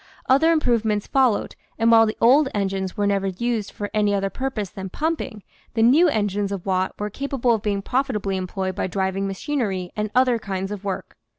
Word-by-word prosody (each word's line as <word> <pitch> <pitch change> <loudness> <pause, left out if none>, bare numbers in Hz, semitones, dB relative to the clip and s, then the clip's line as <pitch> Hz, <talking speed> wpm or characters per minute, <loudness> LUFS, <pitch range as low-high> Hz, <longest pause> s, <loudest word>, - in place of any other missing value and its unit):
Other 295 +6 +5
improvements 230 -9 +1
followed, 260 -6 +1 0.2
and 230 +1 +3
while 225 -1 +7
the 215 - -3
old 265 +4 +5
engines 195 -1 -2
were 205 - +1
never 200 -1 +1
used 215 +2 -2
for 205 -1 -6
any 210 -1 +2
other 195 0 -1
purpose 250 -8 -3
than 190 -1 -7
pumping, 280 - -3 0.3
the 225 - +3
new 290 +10 +6
engines 205 -4 -1
of 195 -3 -5
Watt 185 -1 0
were 210 0 -4
capable 270 -1 0
of 220 - -1
being 200 -2 -1
profitably 220 -7 -1
employed 185 0 -3
for - - -1
driving 190 +1 -1
machinery 195 - -2
and 210 0 -2
other 250 -2 +4
kinds 195 -2 -4
of 205 -1 -6
work. 195 -2 -5
210 Hz, 190 wpm, -23 LUFS, 195-245 Hz, 0.3 s, while